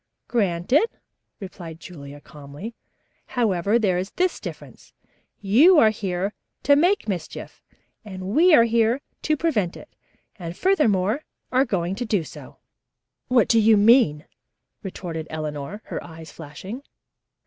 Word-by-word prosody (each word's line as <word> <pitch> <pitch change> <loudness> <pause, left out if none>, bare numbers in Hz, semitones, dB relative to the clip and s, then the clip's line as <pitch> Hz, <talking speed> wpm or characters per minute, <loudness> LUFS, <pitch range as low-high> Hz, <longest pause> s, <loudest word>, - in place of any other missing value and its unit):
"Granted," 215 - +2 0.5
replied 170 -4 -9
Julia 145 -5 -10
calmly. 145 +9 -10 0.5
"However, 210 -4 +1
there 190 -6 +1
is 190 +2 -4
this 365 0 0
difference. - - -10 0.5
You 265 - +6
are 220 -7 +6
here 195 -1 -3 0.3
to 285 - +5
make 350 - +2
mischief 180 -6 -6 0.4
and 190 -3 -8
we 330 - +4
are 230 - +7
here 230 +2 +2 0.2
to 310 0 0
prevent 225 - 0
it, - - -15 0.4
and, 170 -2 -7
furthermore, 240 - +2 0.3
are 260 +2 +3
going 185 -6 -1
to 245 - -3
do 205 -6 0
so." - - -12 0.7
"What 250 -3 +3
do 230 - +4
you 220 0 +5
mean?" 205 - +4 0.6
retorted 170 -4 -6
Eleanor, 155 +5 -5
her - - -5
eyes 160 -2 -11
flashing. 170 - -9
200 Hz, 130 wpm, -23 LUFS, 170-240 Hz, 0.7 s, are